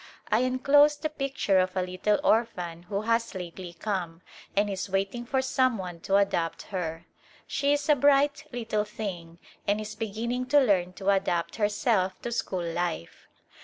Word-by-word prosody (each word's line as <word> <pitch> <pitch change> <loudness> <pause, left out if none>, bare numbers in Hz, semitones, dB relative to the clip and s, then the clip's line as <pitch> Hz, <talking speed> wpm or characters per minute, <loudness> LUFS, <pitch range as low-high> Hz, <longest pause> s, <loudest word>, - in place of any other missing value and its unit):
I 215 - +4
enclose 275 +4 +4
the 310 - -2
picture 270 -9 +1
of 185 +1 0
a 185 - +2
little 185 +3 0
orphan 180 -7 +1
who 200 -1 -1
has 230 0 0
lately 180 -1 -7
come, 175 -2 -4 0.3
and 205 +1 +3
is 195 -1 -4
waiting 195 +5 -2
for 265 +1 +1
some 255 -2 +2
one 180 -3 -6
to 195 +4 0
adopt 185 -4 +1
her. 165 -3 -3 0.4
She 280 0 0
is 290 +1 -1
a 300 - +6
bright 285 +1 +3
little 225 -3 -1
thing 185 -6 -6 0.3
and 205 +1 +2
is 215 0 -5
begin 220 +1 -4
ning 250 +1 -1
to 290 +3 +5
learn 190 -8 +2
to 195 +1 0
adapt 175 -3 0
herself 205 -3 +1
to 240 - -3
school 190 -6 -2
life. 170 - -3
205 Hz, 170 wpm, -27 LUFS, 185-240 Hz, 0.4 s, a